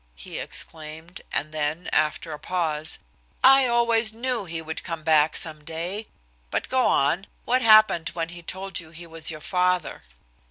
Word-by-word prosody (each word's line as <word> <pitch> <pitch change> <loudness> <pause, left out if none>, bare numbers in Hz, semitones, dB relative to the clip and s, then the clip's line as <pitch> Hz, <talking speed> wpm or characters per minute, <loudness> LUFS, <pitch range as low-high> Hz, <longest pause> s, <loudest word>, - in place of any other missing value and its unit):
he - - -6
exclaimed, 160 +2 -4
and 155 +2 -1
then, 155 +3 -2
after 155 +1 0
a 150 - -7
pause; 160 -2 -1 0.5
"I 270 0 +7
always 235 -2 +2
knew 235 -1 -2
he 165 -1 -4
would 160 0 -6
come 165 -3 -5
back 155 -1 +4
some 155 -2 -1
day. 175 +8 -4 0.4
But - - -2
go 260 -1 +3
on. 165 +8 +2 0.2
What 255 +2 +2
happened 215 -7 +6
when 165 -1 -2
he 175 0 -9
told 190 +3 -4
you 165 -2 -10
he 170 +2 -10
was 165 -1 -2
your 155 -1 -6
father?" 180 0 0
170 Hz, 165 wpm, -25 LUFS, 160-210 Hz, 0.5 s, I